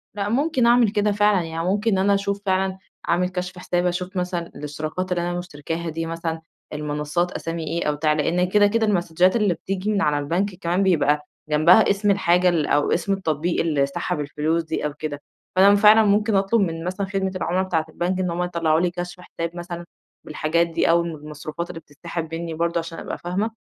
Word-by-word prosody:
لأ، 205 0 -2
ممكن 270 +1 +1
أعمل 235 -1 +5
كده 210 0 +1
فعلًا، 205 -2 +3
يعني 165 0 -4
ممكن 205 +1 +1
أنا 195 +2 +3
أشوف 200 0 -1
فعلًا 190 0 0 0.3
أعمل 180 +2 +2
كشف 180 0 -5
حساب، 175 0 -1
أشوف 180 +2 -2
مثلًا 180 -2 -2
الإشتراكات 155 +5 -5
اللي 175 - +1
أنا 175 0 -2
مشتركاها 165 0 -5
دي 165 +1 -3
مثلًا، 165 0 -4 0.3
المنصات 150 +3 -2
أسامي 165 0 -4
إيه 170 +1 -2
أو 150 - +1
بتاع. 150 +1 +1
لأن 170 +4 +1
كده، 205 +1 +5
كده 225 +1 +1
المسدچات 180 0 +2
اللي 210 -5 +2
بتيجي 190 +4 -3
من 200 -2 +1
على 150 -3 +2
البنك 180 +7 -1
كمان 175 +1 0
بيبقى 150 -5 +2 0.2
جنبها 170 +8 +5
اسم 200 +1 +2
الحاجة 180 -2 +3
ال 165 -4 +1
أو 145 0 +2
اسم 195 +3 +1
التطبيق 170 -3 -1
اللي 150 -4 +1
سحب 140 +2 -3
الفلوس 150 +3 -1
دي 160 -1 -3
أو 150 - -2
كده، 145 -1 -5 0.3
فأنا 200 +2 +7
فعلًا 210 +2 +7
ممكن 210 0 +2
أطلب 195 +3 +2
من 165 -3 -2
مثلًا 185 +3 -3
خدمة 190 -1 -1
العُمَلا 185 +1 0
بتاعت 160 -4 -1
البنك 180 +3 -2
إن 180 -1 0
هم 175 +1 -1
يطلعوا 165 -2 +1
لي 175 0 +1
كشف 175 0 -6
حساب 170 -1 -6
مثلًا 175 0 -6 0.4
بالحاجات 160 +2 0
دي، 165 - 0
أو 170 +1 +5
المَ 170 -1 -4
المصروفات 150 +3 -7
اللي 165 -2 -7
بتتسحب 165 +2 -6
منّي 165 0 -4
برضه 170 +1 0
عشان 165 0 -7
أبقى - - -5
فاهمة. 190 +6 -2
175 Hz, 200 wpm, -23 LUFS, 165-195 Hz, 0.4 s, فأنا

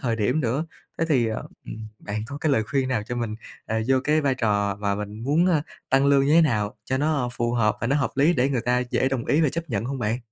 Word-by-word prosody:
thời 115 -3 -1
điểm 110 +8 +1
nữa. 135 +5 -1 0.3
Thế 165 - +2
thì, 130 -7 +3
ờ, 110 -1 -3 0.2
ừm, 110 0 -7
bạn 105 +1 -4
có 140 +2 -7
cái 155 -1 +1
lời 110 - +3
khuyên 130 +2 -1
nào 125 -5 0
cho 120 +3 -5
mình, 115 -3 -2 0.3
à, 110 0 -1
vô 135 - +4
cái 155 +1 +3
vai 140 -2 +1
trò 105 -5 0
và 100 -1 -1
mình 105 +2 -6
muốn, 160 +6 +3
ơ, 160 -5 +2 0.3
tăng 135 +1 +4
lương 140 -1 +4
như 145 - +3
thế 165 - +7
nào 115 -7 +1
cho 130 - -1
nó 145 -4 +1
phù 120 -1 -1
hợp 110 -3 +2
và 115 - -1
nó 140 +4 +2
hợp 135 - 0
lý 145 +5 +4
để 130 -2 +2
người 125 -4 0
ta 125 +1 +1
dễ 130 - +2
đồng 130 -3 -2
ý 150 - +3
về 155 -4 +3
chấp 165 0 -5
nhận 105 -1 -1
hông 135 +2 -3
bạn? 115 0 -1
125 Hz, 280 wpm, -24 LUFS, 110-140 Hz, 0.3 s, thế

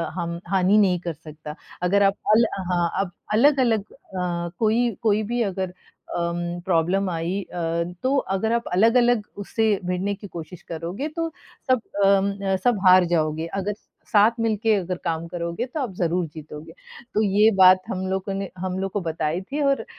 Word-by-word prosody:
हम 170 -1 -3
हानि 190 +2 +3
नहीं 190 -4 +3
कर 170 -1 -4
सकता। 155 0 -10 0.3
अगर 200 +3 +3
आप 195 0 +3 0.2
अल 230 +1 +5 0.3
हाँ, 175 -1 +1
अप 190 -3 -3 0.2
अलग-अलग 240 -2 +4
अ, 180 -7 -4
कोई 230 +2 +2
कोई 215 -1 +2
भी 240 - +1
अगर 190 -3 -3 0.4
अम 170 0 -1 0.3
प्रॉब्लम 185 +2 +1
आई 175 +3 -2
अ, 170 -1 -2 0.2
तो 260 +2 +2 0.2
अगर 220 +4 0
आप 235 0 +1
अलग-अलग 235 +4 +4 0.2
उससे 225 +3 -1 0.2
भिड़ने 180 +3 -1
की 205 +1 -10
कोशिश 170 -1 -9
करोगे 175 - -4
तो 330 -1 -1 0.4
सब 255 -3 +4 0.2
अम 195 0 +4 0.2
अ, - - +3
सब 245 -4 +3
हार 185 0 +7
जाओगे, 155 -1 0
अगर 195 +3 -3 0.4
साथ 215 +1 +6
मिलके 220 -1 +2
अगर 180 -2 -2
काम 165 0 -2
करोगे 170 +6 -3
तो 260 +5 -6
आप 250 -8 -3
ज़रूर 175 +1 +1
जीतोगे। 155 +1 -10 0.4
तो 215 - +2
ये 210 +2 +4
बात 185 0 +8
हम 190 0 -3
लोगों 190 +1 -2
ने 195 -1 -3
हम 185 +1 -3
लोग 195 0 -2
को 205 - -2
बताई 160 0 -2
थी 280 +10 -4
और 275 -5 +1
190 Hz, 175 wpm, -23 LUFS, 170-215 Hz, 0.4 s, बात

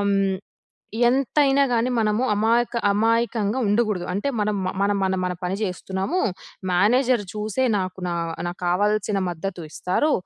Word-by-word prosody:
హ్మ్, 195 -1 +2 0.7
ఎంతైనా 275 +2 +3
గాని 235 +1 +2
మనము 215 +2 +1
అమాయక 230 +3 +1
అమాయకంగా 225 +2 +1
ఉండకూడదు. 205 -4 +1
అంటే 205 +9 -1
మనం 210 0 0
మ - - 0
మన, 200 +1 +2
మన, 190 0 +1
మన 180 0 -1
పని 180 +2 -1
చేస్తున్నాము. 190 - -2 0.5
మేనేజర్ 235 +5 +3
చూసే 215 +4 -2
నాకు 185 -1 -4
నా 175 - -1 0.3
నాకావాల్సిన 195 +3 0
మద్దతు 175 +1 -5
ఇస్తారు. 185 - 0
210 Hz, 130 wpm, -23 LUFS, 190-235 Hz, 0.7 s, ఎంతైనా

